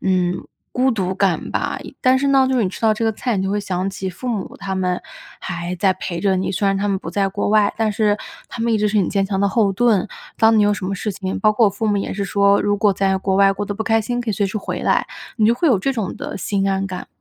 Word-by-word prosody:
嗯， 180 -1 0 0.3
孤 255 +1 +2
独 190 -5 -1
感 190 -3 0
吧， - - -2 0.2
但 260 0 +4
是 280 +1 0
呢， 270 -1 +4
就 260 - +1
是 240 - +2
你 - - 0
吃 - - -9
到 220 -1 +4
这 215 +2 -2
个 225 - +2
菜， 240 0 -2
你 190 - 0
就 195 - -1
会 205 - 0
想 190 -1 -2
起 190 0 -5
父 185 +8 -9
母 215 -5 -3
他 195 -1 -4
们 180 -1 -1 0.4
还 175 0 -4
在 190 +2 +3
陪 180 -2 -5
着 195 -2 +2
你， 185 - -1
虽 200 +2 0
然 195 0 +2
他 205 +1 -1
们 195 -1 0
不 - - -7
在 195 -1 +1
国 200 +2 -2
外， 210 -1 +3
但 225 -1 +1
是 205 0 +2 0.3
他 235 - -7
们 235 0 +1
一 220 - +2
直 210 0 +2
是 210 0 +1
你 185 - +1
坚 195 -1 +1
强 195 -1 -2
的 200 - +3
后 205 -2 +2
盾。 215 -2 +2 0.3
当 225 0 +5
你 210 - +5
有 205 0 +3
什 200 - -6
么 195 +2 -2
事 210 +2 -3
情 190 0 -4
包 215 -1 +4
括 220 +1 +4
我 - - +2
父 210 +3 -3
母 205 - +2
也 200 - -2
是 200 0 -2
说， 200 0 +3
如 205 0 +1
果 205 -1 +3
在 195 0 +1
国 190 0 0
外 195 0 +5
过 200 +1 -4
得 205 - -4
不 220 - -3
开 225 0 +3
心， 245 +3 -2
可 240 - -6
以 - - 0
随 200 +1 0
时 195 +3 -3
回 - - -5
来， - - +2 0.3
你 215 - +3
就 230 - +4
会 330 +7 +1
有 240 -8 +4
这 270 +8 0
种 220 -7 -3
的 - - -6
心 195 0 -1
安 195 0 0
感。 185 -1 -6
200 Hz, 320 characters per minute, -20 LUFS, 190-220 Hz, 0.4 s, 当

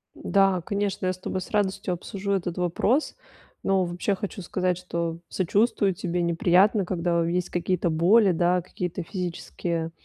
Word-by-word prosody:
Да, 195 -2 +2
конечно, 200 +1 -2
я 185 - +1
с 185 - -11
тобой 185 0 -4
с - - -9
радостью 195 -3 0
обсужу 195 +3 -5
этот 180 -2 -2
вопрос. 190 - +1 0.5
Но, 195 -1 +2
вообще, 180 +3 -1
хочу 205 0 -5
сказать, 180 0 -1
что 170 -2 -3
сочувствую 200 +1 +1
тебе: 175 0 -2
неприятно, 180 +4 +3
когда 170 -2 0
есть 175 +1 -1
какие-то 175 0 0
боли, 185 +6 +5
да, 175 +1 +2
какие-то 180 0 -5
физические, 170 -2 -4
180 Hz, 150 wpm, -25 LUFS, 175-195 Hz, 0.5 s, боли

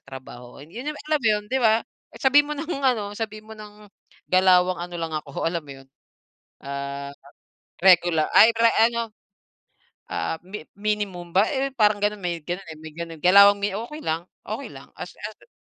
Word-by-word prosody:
sa - - -56
trabaho 125 -2 -11
yun 155 - -16
yun 300 0 -3
alam 305 -2 +2
mo 225 - +3
yun, 210 -1 +1
di 265 - +2
ba? 225 -1 +3 0.3
Sabihin 290 +2 +4
mo 300 - -1
nang 310 +3 -6 0.2
ano, 215 -6 +1
sabihin 215 -1 -5
mo - - -9
ng 210 0 -13 0.5
galawang 185 -1 +4
ano 175 0 -6
lang 165 -1 -4
ako, 140 -2 -6
alam 170 0 -1
mo 140 - -10
yun? - - -23 0.8
Ah, 140 0 -5 0.7
regular 175 -4 +5
ay 230 - +8
pre 230 0 +5 0.2
ano, 235 -1 -3 1.0
ah, - - -2
mi 190 -4 -8
minimum 200 -4 -3
ba 200 +3 +5
eh, 275 -1 -1
parang 210 -3 +3
ganon 210 0 0
may 175 -2 -2
ganun 180 +3 -5
eh, - - -9
may 160 0 -10
ganun 165 -1 -7
galawang 200 +2 +7
mi 205 - +1
okey 240 +9 -6
lang 165 +2 -2 0.2
okey - - -5
lang - - -13
as - - -7
as - - -9
200 Hz, 185 wpm, -24 LUFS, 170-220 Hz, 1.0 s, ay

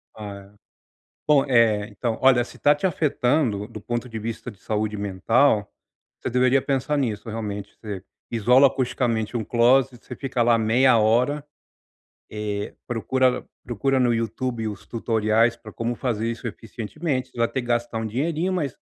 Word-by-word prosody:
Ah 105 -2 -7 0.2
é, - - -27 0.7
bom 145 -2 +5
eh, 115 -5 +3
então 110 +2 -3
olha, 130 -2 +5
se - - -13
está 145 - +4
te 145 +6 -1
afetando 135 - +1
do 110 -2 -9
ponto 120 +3 -3
de 115 -2 -5
vista 115 +3 -5
de 100 - -17
saúde 105 0 -2
mental, 105 +3 +2 0.5
você - - -3
deveria 125 +2 +3
pensar 135 +2 -1
nisso 115 -4 -2
realmente, 105 -2 -5
você 100 -4 -6 0.3
isola 125 +4 +5
acusticamente 120 -4 -1
um 115 - -2
closet, 120 +2 +3
você 125 - -7
fica 130 -3 -1
lá 115 0 +4
meia 120 +3 +4
hora, 125 +7 +2 0.9
eh 105 -1 -4
procura 125 +2 0 0.2
procura 130 +3 0
no 120 -2 +3
Youtube 115 0 -2
os 105 -2 -8
tutoriais 115 0 +1
pra 110 -2 -12
como 115 +1 -2
fazer 115 -2 -1
isso 115 +1 -6
eficientemente, 125 - -4
você - - -14
vai 115 0 +2
ter 130 - -2
que 120 - -9
gastar 120 -1 0
um 110 - -2
dinheirinho 160 - -1
mas, 150 -9 -2
120 Hz, 165 wpm, -24 LUFS, 110-130 Hz, 0.9 s, bom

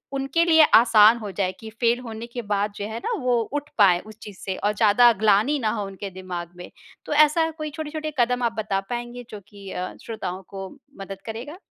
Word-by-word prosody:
उनके 275 +5 +1
लिए 320 -2 +6
आसान 225 -1 +7
हो 210 -3 -6
जाए 185 -2 0
की 220 - -9
फ़ेल 240 0 +2
होने 230 -2 -7
के 240 0 -6
बाद 205 -1 -1
जो 205 - -5
है 220 +1 -6
ना, - - -1
वो 245 -2 +2
उठ 290 0 -3
पाए 185 -5 +5
उस 215 +2 -13
चीज़ 200 -3 -10
से 190 - -4
और 210 +1 0
ज़्यादा 230 +3 +5
ग्लानि 220 +7 +3
ना 220 - 0
हो 205 - -3
उनके 195 0 -7
दिमाग 180 -2 -7
में 180 - -9 0.4
तो - - -3
ऐसा 305 +2 +4
कोई 310 -1 -4
छोटे-छोटे 310 0 -5
कदम 245 +1 +2
आप 235 -1 +1
बता 205 -3 -1
पाएँगे 240 0 -5
जो 210 - -8
कि 200 -1 -12
अ, 180 0 -4
श्रोताओं 190 -5 -5
को 195 -1 -7 0.3
मदद 195 0 -8
करेगा? 235 +9 -7
220 Hz, 215 wpm, -24 LUFS, 200-250 Hz, 0.4 s, आसान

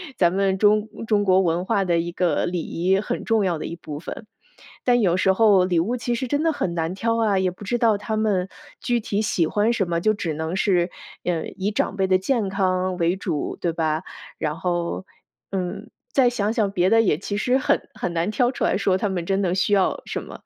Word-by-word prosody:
咱 175 -6 +3
们 195 0 +1
中 210 +1 +3 0.2
中 205 -2 +2
国 190 0 +4
文 175 0 0
化 195 - +1
的 170 -2 +1
一 170 +1 -3
个 175 -4 +1
礼 175 -1 -2
仪， 185 +5 0
很 240 +3 -4
重 225 -3 +2
要 175 -3 0
的 - - -5
一 170 - -5
部 150 -3 -8
分。 215 - -8 0.6
但 245 -1 +4
有 180 -4 +2
时 190 +1 +3
候 200 -3 +5
礼 175 -3 +2
物 235 +8 -1
其 240 +1 -2
实 260 - -2
真 285 +4 0
的 325 0 +2
很 180 -11 -2
难 165 +2 -2
挑 230 +2 0
啊， 205 -3 +2
也 185 -1 +1
不 190 +3 -11
知 240 +4 0
道 225 -3 +3
他 220 +2 -3
们 205 -4 +1 0.3
具 240 -1 0
体 210 0 -1
喜 175 -6 +1
欢 210 +7 +1
什 195 -6 -1
么， 170 -1 0
就 215 +5 +2
只 180 -6 -3
能 160 +3 -3
是， 180 -2 +2 0.4
呃， 170 -2 -1
以 195 +2 -1
长 205 -1 -1
辈 190 0 +1
的 185 - +4
健 215 +2 0
康 185 -1 0
为 175 +1 +1
主， 170 -6 -3
对 170 -2 -1
吧？ 160 0 -1 0.3
然 150 -1 -2
后， 175 +1 -2 0.5
嗯， 185 -2 -4 0.2
再 260 -3 +5
想 220 -3 -1
想 215 -5 +1
别 185 -1 +2
的 225 0 +6
也 190 -9 +2
其 205 +3 -4
实 250 +4 +2
很 260 - 0
很 175 - -3
难 170 +3 0
挑 245 +2 +2
出 265 - -4
来 - - +2
说 195 -2 +2
他 205 - -1
们 175 -3 -3
真 195 +2 0
的 180 -2 0
需 195 +2 +1
要 195 - +2
什 - - -4
么。 - - -11
190 Hz, 250 characters per minute, -23 LUFS, 175-215 Hz, 0.6 s, 的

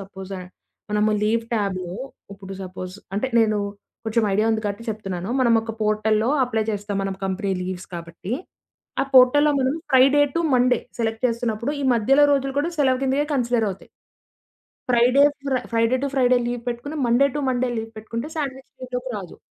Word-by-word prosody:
Suppose 195 0 -8 0.6
మనము 210 +1 +2
leave 225 +2 +1
ట్యాబ్‌లో, 185 -4 -2 0.4
ఇప్పుడు 195 0 -9
సపోజ్ 185 0 -7 0.2
అంటే 210 - 0
నేను 215 -2 +2 0.5
కొంచెం 220 0 +1
ఐడియా 215 +2 +2
ఉంది 220 0 -1
కాబట్టి 205 +3 -3
చెప్తున్నాను. 195 -4 -5
మనం 240 -2 +4
ఒక 225 0 -5
పోర్టల్‌లో 215 +1 +1 0.2
అప్లై 225 -3 -1
చేస్తాం 205 0 -3
మనం 195 -1 -3
కంపెనీ 195 +1 -1
లీవ్స్ 185 0 -5
కాబట్టి. 170 +4 -7 0.7
ఆ - - 0
పోర్టల్‌లో 265 +4 +7
మనం 260 +3 +1 0.2
ఫ్రైడే 270 +3 +6
టు 335 - +1
మండే 250 -1 +3 0.2
సెలెక్ట్ 225 +2 -2
చేస్తున్నప్పుడు, 235 +2 -2
ఈ - - -1
మధ్యలో 270 +6 +4
రోజులు 275 -1 0
కూడా 335 +4 -1
సెలవు 260 -3 +3
కింద 270 +2 +1
కన్సిడర్ 240 -3 +1
అవుతాయి. 190 - -10 1.0
Friday, 250 +3 +5 0.2
fry 260 -2 +1
Friday 230 +2 +3
to - - +1
Friday 255 -2 +4
leave 240 -1 -3
పెట్టుకొని 245 +6 -5
మండే 240 +4 +4
టు - - -1
మండే 255 0 0
లీవ్ 225 0 -4
పెట్టుకుంటే 230 +4 -5
సాండ్‌విచ్ 270 -3 -4
లీవ్‌లోకి 250 0 -4
రాదు. 190 -4 -8
230 Hz, 165 wpm, -23 LUFS, 205-255 Hz, 1.0 s, పోర్టల్‌లో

